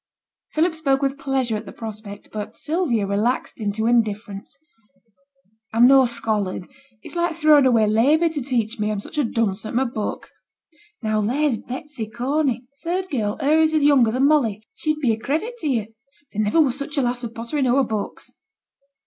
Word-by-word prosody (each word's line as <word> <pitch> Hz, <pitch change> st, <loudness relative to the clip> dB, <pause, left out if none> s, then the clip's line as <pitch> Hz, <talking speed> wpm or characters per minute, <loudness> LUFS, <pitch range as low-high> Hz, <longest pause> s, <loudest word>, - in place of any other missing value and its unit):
Philip 320 Hz, +2 st, +2 dB
spoke 280 Hz, -4 st, 0 dB
with 275 Hz, 0 st, -1 dB
pleasure 265 Hz, -4 st, 0 dB
at 210 Hz, 0 st, -6 dB
the -, -, -7 dB
prospect, 215 Hz, -2 st, -8 dB
but 215 Hz, +1 st, -6 dB
Sylvia 295 Hz, -, 0 dB
relaxed 215 Hz, +5 st, -1 dB
into 215 Hz, +1 st, -1 dB
indifference. 215 Hz, -4 st, -1 dB, 1.2 s
'I'm 230 Hz, +2 st, +6 dB
no 265 Hz, 0 st, +7 dB
scholard; 220 Hz, -6 st, -2 dB, 0.4 s
it's -, -, -10 dB
like 345 Hz, -1 st, 0 dB
throwing 305 Hz, -4 st, +5 dB
away 230 Hz, -4 st, +4 dB
labour 270 Hz, +11 st, +3 dB
to 310 Hz, -3 st, -3 dB
teach 240 Hz, -3 st, -1 dB
me, 210 Hz, 0 st, 0 dB
I'm 210 Hz, -1 st, -2 dB
such 250 Hz, -, -5 dB
a -, -, +3 dB
dunce 225 Hz, -4 st, -1 dB
at 220 Hz, -, -6 dB
my 260 Hz, -, +3 dB
book. 235 Hz, -4 st, -4 dB, 0.7 s
Now 215 Hz, -1 st, +1 dB
there's 255 Hz, +4 st, +1 dB
Betsy 260 Hz, -1 st, -6 dB
Corney, 250 Hz, +2 st, -1 dB, 0.2 s
third 360 Hz, +3 st, -2 dB
girl, 215 Hz, -7 st, -1 dB
her 300 Hz, +3 st, +3 dB
as 315 Hz, 0 st, +3 dB
is 310 Hz, -2 st, +2 dB
younger 275 Hz, -6 st, +5 dB
than 255 Hz, +4 st, +2 dB
Molly, 235 Hz, -9 st, +2 dB
she'd 310 Hz, -1 st, -1 dB
be 250 Hz, -5 st, +3 dB
a 220 Hz, -, -4 dB
credit 425 Hz, -, -2 dB
to 315 Hz, -, -3 dB
you. 225 Hz, -5 st, -1 dB, 0.4 s
There 215 Hz, -, 0 dB
niver 215 Hz, +9 st, +2 dB
was 265 Hz, -5 st, +2 dB
such 285 Hz, +1 st, -5 dB
a 275 Hz, -, +3 dB
lass 245 Hz, 0 st, -1 dB
for 240 Hz, -, -3 dB
pottering 235 Hz, +5 st, -2 dB
ower 265 Hz, +3 st, +3 dB
books.' 215 Hz, -4 st, -5 dB
245 Hz, 185 wpm, -22 LUFS, 220-290 Hz, 1.2 s, no